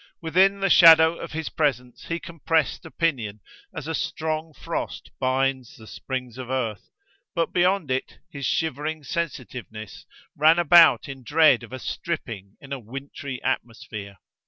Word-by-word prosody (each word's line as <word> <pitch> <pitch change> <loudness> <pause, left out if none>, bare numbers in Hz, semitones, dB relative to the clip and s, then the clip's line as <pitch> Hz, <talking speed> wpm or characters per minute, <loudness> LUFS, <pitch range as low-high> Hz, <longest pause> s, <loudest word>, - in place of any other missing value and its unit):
Within 190 +4 +3
the 195 - +2
shadow 160 -1 +8
of 170 - -7
his 160 0 -3
presence 125 -5 -2
he 170 0 -2
compressed 165 -1 -1
opinion, 130 -12 -2 0.3
as 145 - -7
a 160 - -2
strong 160 +2 -3
frost 145 - -5
binds 130 -1 -1
the 110 - -13
springs 125 +1 -6
of 125 -1 -7
earth, 120 -5 -3 0.5
but 165 -1 0
beyond 180 -4 +2
it 130 0 -2
his 140 -2 -4
shivering 155 0 -2
sensitiveness 125 - -6 0.3
ran 155 +3 +5
about 175 -2 +6
in 135 -1 -8
dread 145 -1 +4
of 120 - -12
a 130 - -5
stripping 115 - -5
in 140 -2 -8
a 135 - -4
wintry 135 +2 -7
atmosphere. 105 -4 -4
140 Hz, 145 wpm, -24 LUFS, 125-165 Hz, 0.5 s, shadow